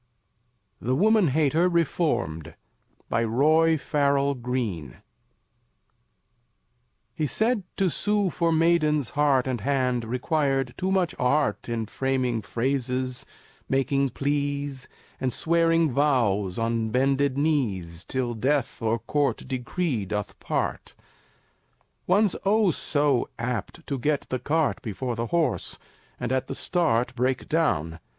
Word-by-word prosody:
THE 125 +2 0
WOMAN 215 +3 +4
HATER 155 +5 +2
REFORMED 130 - -1 0.5
BY 115 - +1
ROY 155 +8 +3
FARRELL 140 -1 +1
GREENE 115 - -3 2.2
He 150 +4 -1
said 225 - +1 0.2
to 195 - +2
sue 205 +1 0
for 170 +1 +1
maiden's 155 -4 +2
heart 145 -4 +2
And 125 -4 -2
hand 125 -1 0
required 135 +1 0
too 190 +1 -2
much 185 -3 +1
of - - -9
art 140 +1 +1
In 115 -1 -2
framing 130 -1 -1
phrases, 130 +2 -2 0.4
making 135 +1 +1
pleas, 140 -1 -2 0.3
And 130 - 0
swearing 165 +1 +2
vows 115 -9 +1
on 115 -1 0
bended 135 +2 +1
knees 100 - -1
"Till 125 -2 -2
death 130 +4 -1
(or 115 +1 +1
court 140 +6 -1
decree) 130 - -2
doth 105 0 -4
part." - - -3 1.1
One's 200 +1 +3
oh, 205 -1 +3
so 145 -4 0
apt 120 - -4
to 140 -3 -3
get 145 +2 0
the 130 - -1
cart 160 +2 0
Before 120 +3 -4
the 115 +1 -3
horse, 170 +2 -1 0.4
and - - -3
at 130 0 0
the 135 - -4
start 125 -10 +1
Break 130 +1 -1
down. 85 - 0
135 Hz, 120 wpm, -25 LUFS, 120-155 Hz, 2.2 s, WOMAN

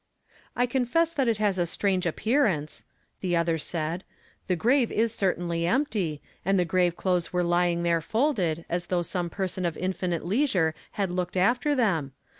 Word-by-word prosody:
" - - -28
I 245 - +3
confess 265 +7 +1
that 270 -5 +1
it 230 -2 +2
has 205 -3 +1
a 175 - +1
strange 185 0 0
appearance," 195 - 0 0.3
the 180 -2 0
other 165 -1 +1
said; 165 +2 -3 0.2
" - - -34
the 185 - +2
grave 240 - +2
is 225 0 +1
certainly 175 -4 0
empty, 195 - 0 0.2
and 195 +1 +2
tlie 175 - +1
grave 180 0 +2
clothes 180 -2 0
were 180 0 +1
lying 175 0 +1
there 170 -1 +2
folded, 185 - 0
as 175 +1 -2
though 175 -1 0
some 175 0 -2
person 190 0 -3
of 170 -3 -1
infinite 180 -2 -2
leisure 190 - +2 0.2
had 195 -3 -1
looked 180 0 -2
after 245 +10 +2
them. 170 - +1
180 Hz, 180 wpm, -27 LUFS, 170-220 Hz, 0.3 s, I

